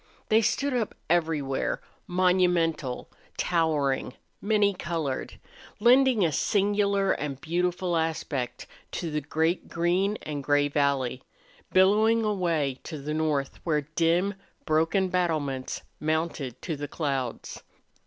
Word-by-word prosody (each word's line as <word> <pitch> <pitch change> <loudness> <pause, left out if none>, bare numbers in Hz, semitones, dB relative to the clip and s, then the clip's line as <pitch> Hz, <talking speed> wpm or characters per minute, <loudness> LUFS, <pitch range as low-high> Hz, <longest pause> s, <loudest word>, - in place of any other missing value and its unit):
They 220 +1 +5
stood 280 +5 0
up 235 -4 -1 0.2
everywhere, 155 -6 0 0.3
monumental, 175 -7 +1 0.3
towering, 150 -7 +1 0.3
many 205 -1 +3
colored, 165 -7 -3 0.4
lending 245 -2 +5
a 160 - +1
singular 200 +4 +2
and 140 -3 -3
beautiful 175 +2 -1
aspect 160 -6 -2 0.3
to 170 -3 -3
the 150 0 -1
great 160 +4 0
green 180 +5 +1
and 145 -2 -4
gray 145 0 +3
valley, 140 -3 0 0.5
billowing 215 +4 +4
away 165 -10 0
to 160 - -5
the 150 +2 -4
north, 150 -3 -1
where 155 -3 +1
dim, 165 +6 +1 0.3
broken 165 +4 +2
battlements 155 -8 -1 0.2
mounted 155 -5 -2
to 165 - -2
the 145 0 -5
clouds. 135 -5 -3
165 Hz, 115 wpm, -27 LUFS, 145-185 Hz, 0.5 s, They